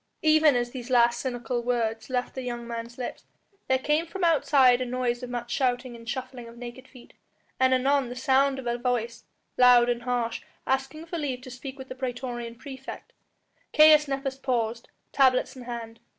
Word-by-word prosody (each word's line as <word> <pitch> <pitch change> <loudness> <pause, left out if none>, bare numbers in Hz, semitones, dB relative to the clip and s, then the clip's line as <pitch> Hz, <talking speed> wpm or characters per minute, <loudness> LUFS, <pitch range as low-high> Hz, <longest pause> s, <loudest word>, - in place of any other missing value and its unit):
Even 310 -2 +5
as 240 0 -1
these 250 -1 -7
last 240 -1 +4
cynical 245 -1 -3
words 230 -2 -1
left 250 -1 -2
the 260 - -5
young 240 -1 -5
man's 235 0 -6
lips 250 - -6 0.4
there 260 - +3
came 300 +5 0
from 380 +2 -5
outside 275 -6 +4
the 255 - -1
noise 245 0 -1
of 250 - -6
much 240 -1 -5
shouting 250 -1 0
and 230 -1 -10
shuffling 255 -2 -5
of 230 +1 -13
naked 245 +2 -9
feet, 250 -3 -16 0.5
and 260 0 +4
anon 265 0 +2
the 245 - -6
sound 270 +1 +2
of 265 - -7
a 240 0 -1
voice, 240 -2 -2 0.3
loud 245 -1 +7
and 240 0 0
harsh, 240 -2 -2 0.2
asking 270 +4 -2
for 340 0 -5
leave 265 -4 -3
to 255 0 -10
speak 265 +2 -8
with 265 -1 -9
the - - -6
praetorian 245 -2 -5
praefect. 265 +2 -9 0.6
Caius 305 -1 +7
Nepos 270 -1 -3
paused, 235 -3 -2 0.2
tablets 260 -1 +3
in 250 -2 -10
hand. 230 -1 -7
250 Hz, 185 wpm, -27 LUFS, 240-270 Hz, 0.6 s, loud